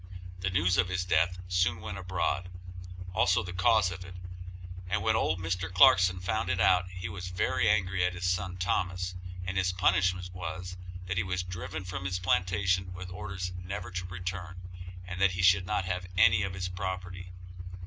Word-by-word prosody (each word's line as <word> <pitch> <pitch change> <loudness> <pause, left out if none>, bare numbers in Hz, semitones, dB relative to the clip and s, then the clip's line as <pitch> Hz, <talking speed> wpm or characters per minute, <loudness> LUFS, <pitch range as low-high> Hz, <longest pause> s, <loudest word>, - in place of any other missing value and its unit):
The 95 +1 -1
news 90 0 +2
of 90 0 +3
his 90 -1 -1
death 90 +1 +2
soon 90 0 +1
went 90 +2 -6
abroad, 90 -1 -1 0.6
also 90 -1 +3
the 90 0 -6
cause 90 0 +3
of 90 +1 -7
it, 90 0 -10 0.7
and 90 - 0
when - - +3
old - - +1
Mr. 90 +1 -2
Clarkson 90 -3 +6
found 95 +2 -1
it 95 -1 0
out 90 0 +4
he 90 0 -6
was 90 0 -6
very 90 +2 +1
angry 95 -3 +2
at 90 0 0
his 90 0 -2
son 90 0 -1
Thomas, 90 0 -1 0.3
and 90 +1 -3
his 95 -1 +2
punishment 90 0 +2
was, 90 0 -5 0.3
that 95 0 -2
he 90 - +2
was 90 0 -2
driven 90 0 -6
from 90 0 -5
his 90 0 -1
plantation 90 0 +1
with 90 0 -8
orders 95 -2 -5
never 95 0 -5
to 90 0 -4
return, 90 0 -5 0.5
and 90 +1 -6
that 100 -1 +4
he 95 +1 -1
should 90 0 +5
not 105 -2 0
have 90 0 -3
any 90 0 +6
of 95 -1 -2
his 90 0 -3
property. 90 0 -5
90 Hz, 185 wpm, -30 LUFS, 90-95 Hz, 0.7 s, Clarkson